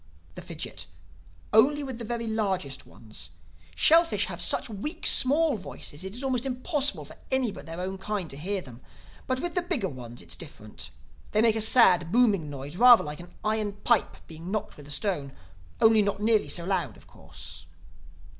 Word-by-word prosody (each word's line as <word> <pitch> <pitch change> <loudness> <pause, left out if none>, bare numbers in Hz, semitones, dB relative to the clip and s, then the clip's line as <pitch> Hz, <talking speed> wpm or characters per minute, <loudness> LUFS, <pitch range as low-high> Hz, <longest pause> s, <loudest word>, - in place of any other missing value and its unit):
The - - -9
Fidgit: - - -7 0.7
"Only 285 +7 +4
with 260 -3 -6
the - - -5
very 230 +1 -4
largest 190 -11 -2
ones. 110 -2 -7 0.5
Shellfish 330 +1 +4
have - - -6
such - - +1
weak 270 - -5
small 290 0 +5
voices 170 -4 -8
it 190 +2 -6
is 250 - -5
almost 255 -3 -1
impossible 275 +2 +1
for - - -14
any 260 -4 +1
but - - -11
their 165 +1 -7
own 190 +1 -4
kind 200 -2 -3
to - - -8
hear 190 +7 -3
them. 125 -1 -13 0.5
But 255 0 -1
with 345 -1 -3
the 360 - +1
bigger 255 - -2
ones 120 -3 -10
it - - -20
is - - -2
different. - - -10 0.4
They 215 - +3
make 225 -2 +4
a 220 - -1
sad, 185 -7 +5
booming 205 -10 +3
noise, 145 +3 -7
rather 245 +1 +8
like 150 0 -7
an 175 0 -11
iron 215 -1 -1
pipe 205 - 0
being 165 +2 -10
knocked 215 +1 -3
with 145 -1 -13
a - - -13
stone—only 140 - 0
not 200 -1 -1
nearly 215 0 +2
so 170 - -2
loud 175 - -2
of - - -19
course." - - -12
205 Hz, 185 wpm, -27 LUFS, 165-245 Hz, 0.7 s, rather